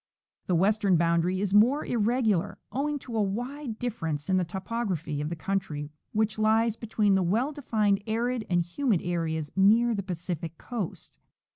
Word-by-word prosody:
The 180 - +2
western 195 +1 +3
boundary 170 +3 +2
is 200 -1 -1
more 245 +8 +5
irregular, 220 -4 +1
owing 290 +3 -1
to 235 - -6
a 220 - +2
wide 240 +5 -3
differ 235 -9 -3
ence 150 +3 -2
in 185 - +4
the 185 - +2
topography 185 -5 -3
of 150 - -2
the 170 - -3
country 160 -5 -3 0.2
which 215 0 0
lies 220 +1 +3
between 215 -3 +1
the 190 - +3
well 220 - +1
defined 215 -8 +1
arid 235 +2 0
and 175 -1 +2
humid 200 - 0
areas 160 -3 -2
near 225 +5 +5
the 200 - -1
Pacific 170 -3 -5
coast. 225 -9 -6
205 Hz, 165 wpm, -28 LUFS, 175-230 Hz, 0.2 s, more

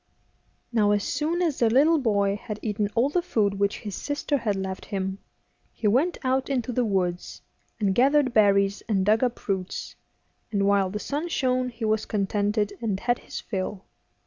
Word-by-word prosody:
Now 215 -3 +3
as 205 -1 +2
soon 330 +4 -1
as 315 -5 0
the 230 - +4
little 300 +7 +4
boy 200 -5 +1
had 210 0 -6
eaten 210 -2 -1
all 240 +4 +3
the 355 +4 +1
food 205 - 0
which 200 0 0
his 205 -2 -6
sister 290 +3 -2
had 215 -4 -1
left 190 -1 -4
him, 190 -1 -3 0.5
he 215 - -2
went 275 - +2
out 260 +1 0
into 255 -3 -1
the 245 +1 +1
woods, 185 -5 -2 0.4
and 200 -3 +2
gathered 270 +3 +3
berries 200 -1 +3
and 195 -3 +2
dug 215 +4 +3
up 245 -1 -2
roots, 190 -2 -3 0.6
and 200 -2 +1
while 200 -1 +3
the 205 - -4
sun 290 +9 -3
shone 255 -5 0
he 230 -2 -5
was 215 0 0
contented 205 +1 0
and 210 -5 -1
had 240 0 +1
his - - -7
fill. 195 -1 -4
215 Hz, 180 wpm, -25 LUFS, 200-255 Hz, 0.6 s, the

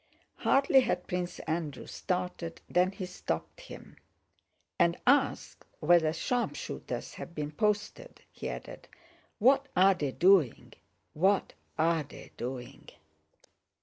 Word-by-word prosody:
Hardly 275 0 +4
had 260 - 0
Prince 180 -2 -3
Andrew 160 -4 -3
started 180 -2 -4
than 180 +1 +2
he 195 -1 -6
stopped 180 - -5
him. - - -12 0.8
"And 170 0 +3
ask 275 +1 +2 0.2
whether 165 0 +4
sharpshooters 240 +9 -3
have 170 - -9
been 150 -1 -3
posted," 210 - -2
he - - -6
added. - - -8 0.5
"What 270 +5 +4
are 190 +2 +6
they 145 -7 -2
doing? 175 - +3 0.4
What 190 +5 +2 0.2
are 165 0 +2
they 145 - -12
doing?" 125 0 -7
180 Hz, 115 wpm, -30 LUFS, 160-210 Hz, 0.8 s, are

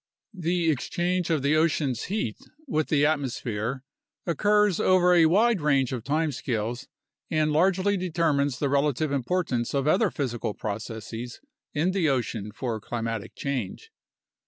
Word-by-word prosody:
The 175 -2 +1
exchange 175 +5 -1
of 155 -5 +1
the 145 +2 +3
ocean's 150 -6 +1
heat 185 - -2 0.3
with 155 - 0
the 145 -2 +3
atmosphere 130 -4 -2 0.4
occurs 205 +3 +2
over 180 -1 +4
a 165 -2 +6
wide 210 +3 +3
range 135 -4 +2
of 120 -4 -4
time 155 +3 0
scales 120 -2 -3 0.4
and 155 -1 +1
largely 190 +5 +2
determines 160 -7 0
the 145 - 0
relative 140 +1 +1
importance 140 -3 -1
of 140 +1 0
other 195 +7 +3
physical 120 -8 -3
processes 110 +3 -6 0.4
in 165 +5 +2
the 185 -5 +1
ocean 115 -5 -2
for 115 -1 -4
climatic 115 -1 -4
change. 130 -9 -4
145 Hz, 135 wpm, -26 LUFS, 120-175 Hz, 0.4 s, a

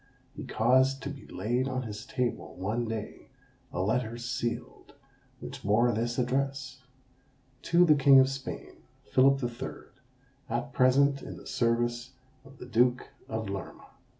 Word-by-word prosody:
He - - -7
caused 130 +4 +2
to 140 - -4
be 140 - -11
laid 120 +7 -1
on 130 -1 -2
his 110 -2 -7
table, 125 -1 -3
one 110 +6 -2
day, 110 -1 -6 0.4
a 90 - -1
letter 115 +3 -1
sealed, 120 0 -4 0.4
which - - -8
bore 115 +4 +3
this 120 +2 -2
address 130 +1 -1 0.8
"To 175 +1 +4
the 155 - +6
King 140 -1 +7
of 130 - +6
Spain, 135 0 -6 0.3
Philip 135 +1 +5
the 120 - 0
Third, 120 +3 -8 0.6
at 120 +3 -3
present 135 +2 +4
in - - -8
the - - -13
service 120 +1 0 0.3
of 135 0 -16
the - - -9
Duke 125 +1 +2 0.2
of 110 -1 -3
Lerma." 100 0 -7
125 Hz, 150 wpm, -29 LUFS, 115-135 Hz, 0.8 s, King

